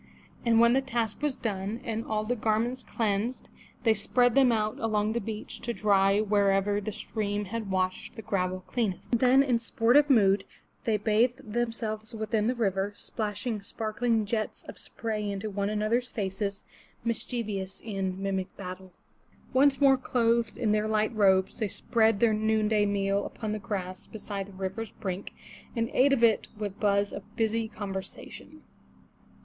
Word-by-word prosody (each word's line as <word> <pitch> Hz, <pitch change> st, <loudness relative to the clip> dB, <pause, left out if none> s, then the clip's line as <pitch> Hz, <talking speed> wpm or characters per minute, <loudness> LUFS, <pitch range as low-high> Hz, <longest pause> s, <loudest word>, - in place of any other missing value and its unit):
And 230 Hz, -1 st, +4 dB
when 235 Hz, +1 st, +6 dB
the 265 Hz, -, +3 dB
task 235 Hz, -4 st, -2 dB
was 295 Hz, -3 st, -1 dB
done, 205 Hz, 0 st, -3 dB
and 225 Hz, -1 st, -2 dB
all 215 Hz, -1 st, -1 dB
the 240 Hz, +3 st, -1 dB
garments 230 Hz, +3 st, 0 dB
cleansed, 220 Hz, +2 st, -2 dB, 0.3 s
they 225 Hz, -3 st, +5 dB
spread 245 Hz, +3 st, +2 dB
them 265 Hz, -1 st, +5 dB
out 215 Hz, -1 st, 0 dB
along 215 Hz, -1 st, 0 dB
the 235 Hz, -, -1 dB
beach 215 Hz, +1 st, -6 dB
to 235 Hz, -, -3 dB
dry 200 Hz, -1 st, +3 dB
wherever 205 Hz, -1 st, +2 dB
the 215 Hz, +1 st, -4 dB
stream 205 Hz, -1 st, -3 dB
had 220 Hz, +1 st, -4 dB
washed 185 Hz, +4 st, -1 dB
the 220 Hz, -, -8 dB
gravel 185 Hz, -2 st, -1 dB
cleanest. 220 Hz, -7 st, -2 dB
Then 255 Hz, +3 st, +5 dB
in 250 Hz, -4 st, +2 dB
sportive 240 Hz, +5 st, +3 dB
mood, 200 Hz, -6 st, +5 dB, 0.4 s
they 220 Hz, -2 st, +2 dB
bathed 225 Hz, +3 st, +1 dB
themselves 225 Hz, -1 st, -2 dB
within 220 Hz, 0 st, 0 dB
the 250 Hz, -, +1 dB
river, 200 Hz, -3 st, 0 dB
splashing 215 Hz, +1 st, -4 dB
sparkling 220 Hz, +2 st, -1 dB
jets 215 Hz, +1 st, -3 dB
of -, -, -10 dB
spray 215 Hz, -2 st, -4 dB
into 200 Hz, +2 st, -4 dB
one 200 Hz, 0 st, -1 dB
another's 215 Hz, +4 st, 0 dB
faces, 200 Hz, -1 st, -3 dB, 0.4 s
mischievous 215 Hz, -4 st, -3 dB
in 195 Hz, -3 st, -3 dB
mimic 190 Hz, -1 st, -2 dB
battle. 185 Hz, -1 st, -8 dB, 0.6 s
Once 270 Hz, +1 st, +4 dB
more 275 Hz, -2 st, +6 dB
clothed 235 Hz, -3 st, +1 dB
in 230 Hz, -4 st, +1 dB
their 210 Hz, 0 st, +1 dB
light 215 Hz, +1 st, +1 dB
robes, 190 Hz, -3 st, +3 dB
they 215 Hz, -, 0 dB
spread 220 Hz, +1 st, +1 dB
their 230 Hz, -1 st, +4 dB
noonday 215 Hz, -1 st, +2 dB
meal 200 Hz, 0 st, +1 dB
upon 215 Hz, -2 st, -5 dB
the 215 Hz, -, -2 dB
grass 185 Hz, -3 st, -5 dB
beside 200 Hz, -2 st, -5 dB
the 200 Hz, -, -13 dB
river's 195 Hz, +4 st, -4 dB
brink, 190 Hz, 0 st, -4 dB, 0.5 s
and 230 Hz, 0 st, -1 dB
ate 275 Hz, +2 st, +4 dB
of 260 Hz, -4 st, +2 dB
it 225 Hz, -2 st, +4 dB
with 205 Hz, -2 st, -5 dB
buzz 200 Hz, -1 st, +2 dB
of -, -, -9 dB
busy 225 Hz, 0 st, 0 dB
conversation. 195 Hz, -3 st, -8 dB
215 Hz, 160 wpm, -28 LUFS, 200-230 Hz, 0.6 s, when